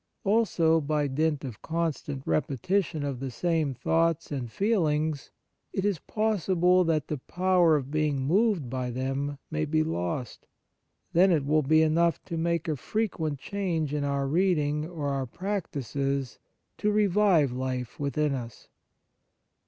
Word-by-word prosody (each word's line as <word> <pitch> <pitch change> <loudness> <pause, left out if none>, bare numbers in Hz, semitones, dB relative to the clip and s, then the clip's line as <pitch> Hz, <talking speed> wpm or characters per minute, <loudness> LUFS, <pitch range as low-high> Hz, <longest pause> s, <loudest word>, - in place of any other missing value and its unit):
Also, 185 -7 +3
by 150 0 0
dint 150 +1 0
of 120 -5 -8
constant 160 -4 -3
repetition 155 - 0
of 140 -3 -3
the 135 0 -4
same 155 +2 0
thoughts 165 +3 +1
and 125 -5 -4
feelings, 155 - 0 0.4
it 190 - -1
is 200 -6 +1
possible 185 -4 +2
that 155 -3 0
the 150 - -3
power 180 +1 +3
of 140 -2 -2
being 150 -2 +1
moved 180 - +2
by 125 0 -3
them 135 +3 -2
may 155 0 -1
be 155 +1 +1
lost; 115 - -4 0.7
then 185 +3 +5
it 150 -5 +2
will 155 +2 +3
be 155 +3 +4
enough 165 +2 +2
to 170 - -5
make 170 0 -1
a 155 - 0
frequent 160 - -2
change 165 -4 -2
in 150 -1 -1
our 140 -1 0
reading 150 -2 +1
or 155 -5 -3
our 135 -2 -2
practices 140 - -3 0.4
to 210 - +1
revive 200 -8 +3
life 125 -1 -4
within 145 +1 0
us. 120 -4 -7
155 Hz, 145 wpm, -27 LUFS, 140-175 Hz, 0.7 s, then